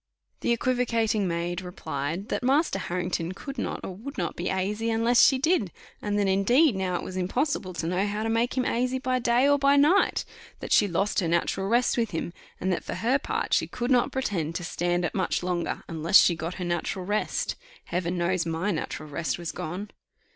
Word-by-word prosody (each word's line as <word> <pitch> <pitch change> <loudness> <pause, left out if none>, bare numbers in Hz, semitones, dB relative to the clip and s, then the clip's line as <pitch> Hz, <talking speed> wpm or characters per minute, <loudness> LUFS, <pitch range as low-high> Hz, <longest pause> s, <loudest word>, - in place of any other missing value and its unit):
The - - 0
equivocating 230 -4 +1
maid 170 +1 -2
replied, 180 - -4
that - - -1
Master 270 - +2
Harrington 175 -1 -2
could 275 +8 -7
not - - -3
or 190 - -5
would 270 +9 -8
not 170 -3 -2
be 175 - -3
asy 210 +4 -1
unless 230 +1 +4
she 270 - +6
did; 265 - +1 0.3
and 205 0 -1
that 205 -1 +2
indeed 235 +8 +4
now 185 -1 -1
it - - -2
was 185 - -7
impossible 185 - -1
to 165 - -3
know 180 +4 0
how 205 +1 -2
to - - -1
make 230 +3 0
him 255 - +1
asy 250 +2 0
by 255 0 0
day 240 +2 +3
or 285 0 +4
by 280 0 +4
night; 300 +8 +3 0.3
that - - -2
she 205 - +5
lost 195 +3 0
her 175 - 0
natural 170 +3 0
rest 240 +4 +2
with 230 -2 +1
him; 170 -1 -4 0.3
and 185 0 0
that - - -3
for - - -5
her 250 +5 +1
part - - -2
she - - +3
could 245 +2 -3
not 245 -2 +3
pretend 175 - -2
to 175 - -3
stand 175 +1 -1
it - - -3
much 185 -2 -1
longer, 175 -1 -2
unless 165 +4 +4
she 175 - +6
got 165 +2 -5
her 180 - -4
natural 175 +2 -2
rest. 210 +2 -1 0.3
Heaven 175 0 -2
knows 175 0 +1
my 165 +5 -1
natural 155 -2 -4
rest 150 -1 -2
was 170 -1 -4
gone! 185 +6 -5
195 Hz, 210 wpm, -26 LUFS, 175-240 Hz, 0.3 s, she